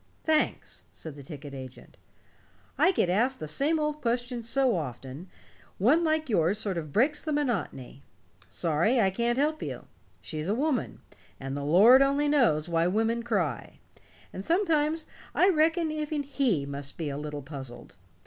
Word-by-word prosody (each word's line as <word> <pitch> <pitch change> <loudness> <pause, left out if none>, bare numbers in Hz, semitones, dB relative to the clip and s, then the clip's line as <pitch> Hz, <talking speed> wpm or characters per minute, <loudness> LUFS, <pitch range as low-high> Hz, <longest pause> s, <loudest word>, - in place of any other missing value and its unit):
"Thanks," 310 -1 0
said 160 -3 -9
the 145 - -10
ticket 140 0 -9
agent. 130 -2 -10 0.8
"I 370 - +4
get 345 - +1
asked 235 +9 +1
the 155 - -5
same 285 - +1
old 300 -1 -2
questions 240 -1 -2
so 265 -2 +2
often, 135 +2 -6 0.5
one 280 - +3
like 315 -1 +1
yours 190 -3 +2
sort 200 -5 -2
of 155 -3 -8
breaks 270 - +2
the 310 - -4
monotony. 205 - -2 0.5
Sorry 170 - +1
I 195 -4 +3
can't 235 +4 0
help 305 +3 0
you. - - -6 0.3
She's 155 +2 -5
a 210 - +1
woman, 285 +1 -1 0.4
and 135 0 -5
the 140 - -4
Lord 205 - +7
only 280 +2 +2
knows 235 - +2
why 165 0 +1
women 225 +5 0
cry. 190 - -2 0.6
And 190 - -6
sometimes 320 - +1 0.3
I 370 - +5
reckon 325 -1 +2
even 305 -1 -2
He 260 - +1
must 140 0 -6
be 155 -4 -3
a - - -5
little 150 -1 -6
puzzled. 130 -4 -9
225 Hz, 160 wpm, -28 LUFS, -, 0.8 s, Lord